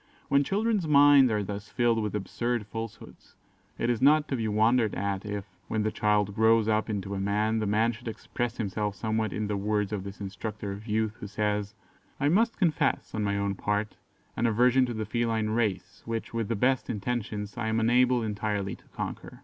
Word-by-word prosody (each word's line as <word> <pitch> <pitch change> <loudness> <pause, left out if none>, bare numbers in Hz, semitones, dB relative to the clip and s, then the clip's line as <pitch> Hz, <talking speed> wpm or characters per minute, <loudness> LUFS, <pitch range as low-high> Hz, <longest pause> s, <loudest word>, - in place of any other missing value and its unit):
When 140 0 +4
children's 205 +1 0
minds 145 -3 +7
are 105 -1 0
thus 100 +1 -6
filled 120 -2 +2
with 105 -1 -2
absurd 120 +3 -2
falsehoods, 115 +1 -8 0.4
it - - -1
is 120 -1 0
not 150 +2 +5
to 135 - 0
be 115 -3 -1
wondered 110 +1 +2
at 100 0 -2
if, 105 -1 -4 0.2
when 110 -1 -1
the 110 - 0
child 105 -1 +1
grows 110 +1 +4
up 110 0 +1
into 100 -2 -3
a 100 - -3
man, 105 +3 +1
the 110 - -1
man 110 +3 +2
should 120 +1 -11
express 120 +1 -4
himself 105 -1 -2
somewhat 110 -1 -1
in 105 - -2
the 105 0 -2
words 105 0 -1
of 100 -3 -3
this 100 0 -8
instructor 100 +1 -5
of 100 +3 -8
youth, 110 0 0
who 105 - -6
says, 105 0 -2 0.4
"I 145 - +2
must 225 +7 +2
confess, 155 -6 +1
on 110 - -1
my 100 -1 0
own 100 0 0
part, 105 +2 -2 0.4
an 120 - +1
aversion 125 +3 +4
to 120 - -4
the 110 0 -3
feline 110 -1 0
race, 110 -5 -1
which, 115 0 -4
with 115 -2 -1
the 115 - -1
best 130 +5 +1
intentions, 105 -2 -3
I 120 -3 -3
am 110 0 +1
unable 120 +1 +3
entirely 105 -2 -2
to - - -26
conquer. - - -6
110 Hz, 200 wpm, -28 LUFS, 105-120 Hz, 0.4 s, minds